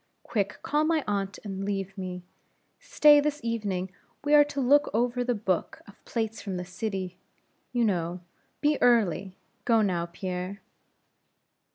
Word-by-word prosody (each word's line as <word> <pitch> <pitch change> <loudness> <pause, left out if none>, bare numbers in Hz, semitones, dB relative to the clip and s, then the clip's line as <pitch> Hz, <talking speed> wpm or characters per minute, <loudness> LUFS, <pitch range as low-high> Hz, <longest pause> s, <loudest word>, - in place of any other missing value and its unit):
Quick, 205 -2 -2
call 300 +1 +1
my 315 -1 +1
aunt, 200 -1 -2
and 195 -2 -5
leave 195 -1 -3
me. 180 -2 -6 0.6
Stay, 300 -12 +6
this 295 0 0
evening 200 -5 -2 0.3
we 290 +1 +1
are 295 0 +9
to 285 -1 -5
look 285 +3 +4
over 245 +1 +1
the 245 -1 0
book 190 -4 -2
of 200 - -17
plates 225 -1 -3
from 195 -3 -4
the 180 - -4
city, 185 -1 -4 0.5
you 240 -2 +2
know. 175 -3 -1 0.4
Be 295 0 +2
early; 200 -6 +3 0.3
go 225 -2 +4
now, 175 -4 0
Pierre." 185 +3 -5
205 Hz, 150 wpm, -27 LUFS, 185-245 Hz, 0.6 s, are